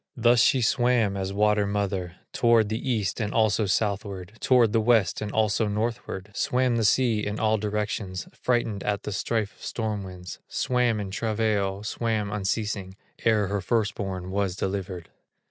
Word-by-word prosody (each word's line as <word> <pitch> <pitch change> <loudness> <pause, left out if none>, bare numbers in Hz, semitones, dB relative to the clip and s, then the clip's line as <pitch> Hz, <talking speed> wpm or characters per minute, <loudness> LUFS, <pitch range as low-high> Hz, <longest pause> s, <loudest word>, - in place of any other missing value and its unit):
Thus 120 0 +5
she 130 +2 +4
swam 120 -3 +2
as 95 0 -3
water 105 0 +2
mother, 100 -3 -2 0.2
Toward 115 -3 +4
the 110 +4 -3
east, 105 -6 0
and 105 -2 -1
also 110 -1 +2
southward, 100 -2 -1
Toward 120 -4 +4
the 115 - +3
west, 110 -5 +2
and 105 -1 -3
also 110 0 +1
northward; 105 -2 -3
Swam 125 +2 +1
the 115 - +1
sea 110 0 +3
in 105 +1 -3
all 110 -1 +2
directions, 105 -2 -3
Frightened 120 -5 -1
at 100 -1 -1
the - - -4
strife 110 +1 -1
of - - -16
storm 110 -3 -3
winds, 90 -1 -9
Swam 125 -3 +1
in 100 -2 -4
travail, 105 -2 -1
swam 110 -1 -1
unceasing, 100 -1 -2 0.3
Ere 110 -2 +4
her 100 +1 -2
first 115 0 0
born 95 -3 -5
was 100 -2 0
delivered. 95 -3 -4
105 Hz, 165 wpm, -26 LUFS, 100-115 Hz, 0.3 s, Thus